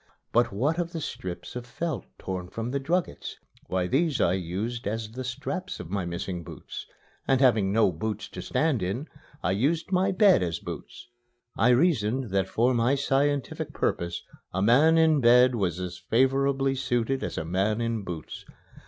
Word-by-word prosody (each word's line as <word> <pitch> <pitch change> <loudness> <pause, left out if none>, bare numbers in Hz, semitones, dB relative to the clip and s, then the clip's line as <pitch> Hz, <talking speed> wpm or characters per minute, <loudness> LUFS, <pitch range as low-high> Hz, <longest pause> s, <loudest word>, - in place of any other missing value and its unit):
But 120 0 +3
what 140 - 0
of 170 -1 -2
the 165 - -3
strips 90 - -6
of 125 - -4
felt 165 +6 -3
torn 90 -1 -5
from 115 +4 -4
the 140 - 0
druggets? 170 +6 -2 0.3
Why, 90 -1 0
these 140 - +1
I 85 - +3
used 100 +6 -3
as 110 0 -3
the 130 +3 -5
straps 180 +9 -4
of 90 -1 -8
my 100 -3 -1
missing 85 +1 -4
boots; - - -9 0.4
and 135 -1 +3
having 110 -7 +4
no 110 -2 +4
boots 105 +6 -4
to - - -7
stand 135 -1 0
in, 100 - -2 0.4
I 90 - +1
used 150 - 0
my 190 +1 +3
bed 195 - +5
as 85 -2 -1
boots. 120 - -8 0.5
I 110 +5 +3
reasoned 125 - +2
that 95 -1 +1
for 120 +3 +2
my 120 +3 +2
scientific 140 0 0
purpose 85 0 -1 0.3
a 95 +2 -1
man 145 +9 +5
in 160 -2 +5
bed 125 +1 +6
was 95 -6 -1
as 90 -1 -5
favorably 135 +6 +2
situated 130 0 -1
as - - -4
a - - -2
man 95 +6 0
in 115 -2 -1
boots. 85 -4 -7
120 Hz, 175 wpm, -27 LUFS, 95-140 Hz, 0.5 s, bed